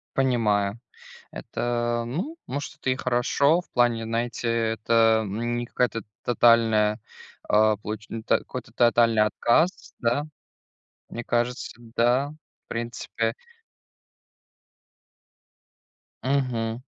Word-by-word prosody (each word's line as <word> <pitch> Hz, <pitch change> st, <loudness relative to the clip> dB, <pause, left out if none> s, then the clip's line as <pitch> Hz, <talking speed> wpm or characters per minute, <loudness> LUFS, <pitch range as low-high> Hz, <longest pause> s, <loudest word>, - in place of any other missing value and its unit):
Понимаю. 110 Hz, -6 st, +1 dB, 0.5 s
Это, 120 Hz, -1 st, -2 dB
ну, 185 Hz, -, -4 dB
может 140 Hz, +2 st, -5 dB
это 130 Hz, -, -2 dB
и 130 Hz, -, +1 dB
хорошо 135 Hz, +6 st, +2 dB
в 180 Hz, -, -19 dB
плане, 120 Hz, -2 st, +2 dB
знаете, 115 Hz, +1 st, -2 dB
э, 115 Hz, -1 st, +1 dB
это, 115 Hz, 0 st, +3 dB
м, 115 Hz, +4 st, -2 dB
не 120 Hz, -, -3 dB
какая-то 120 Hz, -2 st, -1 dB, 0.2 s
тотальная, 115 Hz, -2 st, +4 dB, 0.5 s
а, 110 Hz, 0 st, +4 dB
получ 105 Hz, +1 st, -6 dB
ну 115 Hz, 0 st, -6 dB
так, -, -, +2 dB
какой-то 125 Hz, -3 st, -8 dB
тотальный 115 Hz, -2 st, +4 dB
отказ, 120 Hz, +10 st, +1 dB
да. 120 Hz, +5 st, +1 dB, 0.9 s
Мне 120 Hz, 0 st, -6 dB
кажется, 120 Hz, +1 st, -1 dB
да, 120 Hz, +3 st, +1 dB, 0.4 s
в -, -, -74 dB
принципе 115 Hz, 0 st, -3 dB, 2.9 s
Мгм. 125 Hz, -4 st, -1 dB
120 Hz, 105 wpm, -25 LUFS, 115-125 Hz, 2.9 s, тотальная